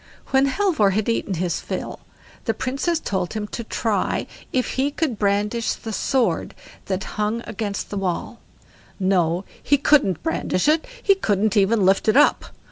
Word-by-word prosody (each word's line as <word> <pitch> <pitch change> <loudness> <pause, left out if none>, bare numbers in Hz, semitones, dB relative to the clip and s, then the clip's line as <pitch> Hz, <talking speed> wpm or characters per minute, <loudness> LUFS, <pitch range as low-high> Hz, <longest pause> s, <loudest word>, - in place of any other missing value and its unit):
When 270 +1 +4
Halvor 290 - +2
had 215 +1 0
eaten 215 -4 -1
his 175 0 -1
fill, - - -5 0.5
the - - 0
Princess 275 +6 -1
told 185 - -2
him 215 -1 -3
to 235 - -5
try 220 -1 -1 0.3
if 255 -1 0
he 270 +2 +1
could 290 -6 -2
brandish 210 +3 +1
the 225 - -7
sword 260 +4 0 0.3
that 190 0 -2
hung 215 +3 -2
against 205 -2 -4
the 205 - -3
wall; 185 -3 -3 0.6
no, 185 -1 +1 0.2
he 285 - +3
couldn't 280 - +3
brandish 310 - 0
it, 315 +5 +3 0.2
he 395 - +6
couldn't 215 - 0
even 205 0 +3
lift 195 +3 +3
it 215 - +4
up. 295 - +4
215 Hz, 160 wpm, -22 LUFS, 195-270 Hz, 0.6 s, he